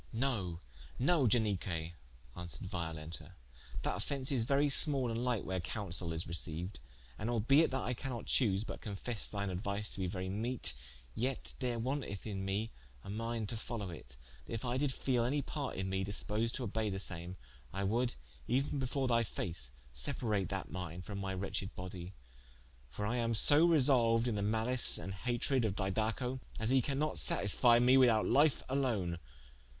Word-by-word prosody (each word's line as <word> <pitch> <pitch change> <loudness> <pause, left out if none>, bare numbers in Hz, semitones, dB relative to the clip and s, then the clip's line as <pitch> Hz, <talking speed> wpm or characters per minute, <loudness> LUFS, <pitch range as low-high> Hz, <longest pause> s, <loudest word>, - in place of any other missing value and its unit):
"No, 110 -9 -1 0.4
no 140 0 +3
Ianique" 95 -7 0 0.4
answered 90 +1 -5
Violenta, 80 -1 -5 0.5
"that - - 0
offence 135 -2 -2
is 120 -5 +1
very 140 +3 +3
small 135 -3 +6
and 115 - -2
lighte, 120 -4 0
where 95 -1 -2
counsaile 90 -1 -3
is 80 0 -3
receiued: 85 +2 -3 0.4
and 110 - -2
albeit 130 +7 +4
that 130 -1 -2
I 125 - -1
cannot 120 -1 -5
chose, 105 -5 +2
but - - -7
confesse 105 +2 -1
thine 100 -2 -2
aduise 100 +3 0
to - - +4
be 95 - 0
very 95 +1 -3
meete, 110 - +1 0.4
yet 130 - -2
there 125 -3 -1
wanteth 125 -4 -3
in 100 -3 -3
me 100 +4 -2 0.3
a - - -7
minde 115 0 -3
to - - -2
followe 110 -4 -5
it: 65 -5 -10 0.3
that - - -6
if 115 - -4
I 120 +1 0
did 145 +1 +1
feele 130 -2 0
any 140 +4 0
part 140 -1 -4
in 95 0 -2
me 95 0 -1
disposed 105 +3 -1
to 130 - -2
obeye 110 +1 -1
the 95 - -3
same, 90 -1 -3 0.3
I 100 - -3
would 120 +5 +1 0.3
euen 135 +3 +1
before 135 +1 -1
thy 115 -1 +3
face, 80 - -3 0.2
separate 95 - 0
that - - -4
minde 90 -1 -5
from 100 -2 -5
my 95 -1 -3
wretched 95 +1 -3
bodie: 90 0 -7 0.7
for 105 +12 -4
I 120 +4 0
am 115 -1 0
so 145 +8 +5
resolued 125 -7 +4
in 120 - +1
the 105 - -1
mallice 110 +4 +4
and 95 - -5
hatred 120 +5 0
of 105 -3 0
Didaco, 110 +6 -1 0.2
as 110 +2 0
he 130 0 +5
cannot 140 +4 0
satisfie 120 +4 +4
me 125 +2 +6
without 120 -4 +5
life 145 +3 +4
alone. 110 -11 0
110 Hz, 175 wpm, -34 LUFS, 95-125 Hz, 0.7 s, small